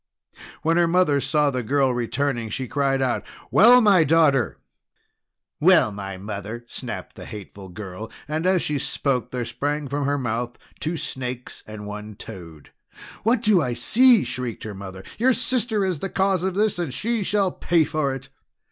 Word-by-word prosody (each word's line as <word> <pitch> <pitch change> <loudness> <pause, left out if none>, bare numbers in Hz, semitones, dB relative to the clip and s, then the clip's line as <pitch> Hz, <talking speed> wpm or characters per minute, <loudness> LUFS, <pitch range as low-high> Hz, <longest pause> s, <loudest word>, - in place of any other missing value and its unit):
When 165 +2 +2
her 175 -1 +4
mother 165 -5 +3
saw 150 -1 +2
the 130 -1 -2
girl 135 +2 +1
returning, 120 0 -1
she 130 +4 -4
cried 135 0 +1
out: 125 -2 0 0.3
"Well, 245 +5 +7
my 200 -6 +6
daughter!" 155 -4 +3 1.0
"Well, 110 - +5
my 100 -2 -6
mother!" 105 +4 -6
snapped - - -7
the - - -9
hateful 100 -2 -9
girl, 100 +3 -8 0.2
and 155 +4 -1
as 185 -2 +3
she 150 -2 -1
spoke 125 -4 -1
there 125 -2 -3
sprang 145 +3 -2
from 140 +1 -2
her 145 0 +1
mouth 120 -1 -3 0.2
two 165 +2 -2
snakes 125 -4 -5
and 110 -1 -8
one 105 0 -7
toad. 85 -9 -11 0.5
"What 230 +2 +1
do 210 -6 +4
I 125 -4 -1
see!" 230 - +5
shrieked 125 -2 -5
her 110 - -6
mother. 95 -1 -9 0.2
"Your 255 +3 +4
sister 235 -5 0
is 180 -5 -1
the 195 - -3
cause 190 -2 +1
of 185 0 -2
this, 210 -2 +1
and 170 -6 -2
she 225 - -1
shall 200 -1 +1
pay 170 -2 +2
for 155 -3 -1
it!" 135 0 -10
140 Hz, 175 wpm, -23 LUFS, 115-180 Hz, 1.0 s, Well